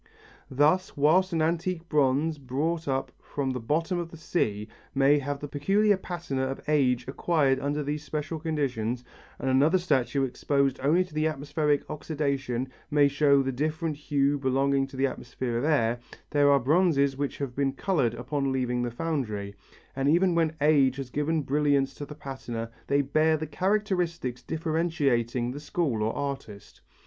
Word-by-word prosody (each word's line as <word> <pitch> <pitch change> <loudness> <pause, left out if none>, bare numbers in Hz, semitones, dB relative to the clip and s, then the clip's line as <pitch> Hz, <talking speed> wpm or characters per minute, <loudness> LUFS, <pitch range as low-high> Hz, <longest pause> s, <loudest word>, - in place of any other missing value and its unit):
] - - -27
Thus 185 +4 +2
whilst 175 +6 +4
an 165 -2 +1
antique 170 +1 -1
bronze 150 +1 +1
brought 150 +6 -2
up 135 -1 -1
from 135 -2 -3
the 130 - -3
bottom 165 +9 0
of 170 -1 -4
the 165 - -11
sea 105 -10 -1 0.3
may 140 +2 +4
have 140 0 -3
the 145 - -5
peculiar 195 +9 +2
patina 175 -7 -4
of 135 - -4
age 130 -5 +2
acquired 140 -1 +1
under 145 +2 -1
these 145 +1 -3
special 150 +2 -4
conditions 130 -7 -2 0.3
and - - -4
another 140 +7 +4
statue 140 -6 +1
exposed 135 +1 0
only 160 +7 +3
to 155 -4 -2
atmospheric 145 0 0
oxidation 140 -5 -2 0.2
may 145 -1 +5
show 140 -1 +3
the 135 - -1
different 155 +4 -2
hue 145 -1 0
belonging 135 +1 +1
to 135 - -11
the 135 - +2
effect 125 -2 -6
of 120 -1 0
air, 120 -6 +2 0.3
there 145 -1 +4
are 140 - +5
bronzes 140 -1 +3
which 140 0 -3
have 135 -3 -4
been 140 -1 +1
coloured 135 - 0
upon 140 -1 -2
leaving 125 -2 0
the 120 - -1
foundry, 115 -8 -3 0.4
and 135 +1 +1
even 175 +3 +4
when 165 -2 +1
age 140 -4 +4
has 135 -2 -6
given 150 +2 0
brilliance 140 -1 +1
to 145 - -8
the 150 - -9
patina 120 -5 -6 0.2
they 140 0 +2
bear 155 +3 +2
the 155 - -4
characteristics 180 - -1
differentiating 145 -6 0
the 140 - -6
school 145 -6 -1
or 110 +1 +1
artist. 135 -8 -6
145 Hz, 165 wpm, -27 LUFS, 130-155 Hz, 0.4 s, may